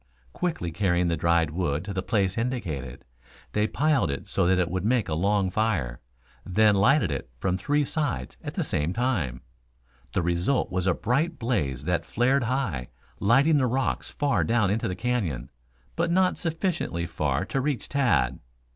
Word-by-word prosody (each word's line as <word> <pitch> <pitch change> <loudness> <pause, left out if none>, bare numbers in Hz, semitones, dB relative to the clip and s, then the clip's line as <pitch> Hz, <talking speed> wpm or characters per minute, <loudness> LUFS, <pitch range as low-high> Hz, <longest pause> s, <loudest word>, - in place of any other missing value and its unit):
Quickly 160 - -2
carrying 90 0 +1
the 85 - +1
dried 85 -1 +2
wood 85 -1 -1
to 100 - -4
the 95 - -1
place 100 -3 0
indicated, 90 - -3 0.5
they 105 0 +1
piled 150 - +2
it 70 -1 -4
so - - +1
that 95 0 +4
it 90 -2 0
would 95 0 -2
make 115 +1 +2
a 80 - -2
long 95 +3 +1
fire, 85 - 0 0.4
then 105 +3 +4
lighted 100 - +3
it 70 -3 -4
from 90 +8 0
three 145 +9 +1
sides 135 - -2
at - - -6
the - - 0
same 75 +4 -1
time. 90 - -1 0.7
The 90 - +1
result 85 +10 +1
was 95 0 -1
a 90 - +3
bright 150 - 0
blaze 75 - -1
that 85 -1 0
flared 120 +7 +1
high, 110 - -1 0.3
lighting 135 +9 +4
the 130 -3 +2
rocks 130 +2 -1
far 145 -1 +1
down 110 -4 +2
into 110 +2 0
the 90 - -3
canyon, 95 - -2 0.4
but 170 +1 0
not 185 +1 +3
sufficiently 165 - -1
far 75 -1 -1
to 135 - -1
reach 140 -2 -2
Tad. 110 - +1
100 Hz, 175 wpm, -26 LUFS, 85-130 Hz, 0.7 s, that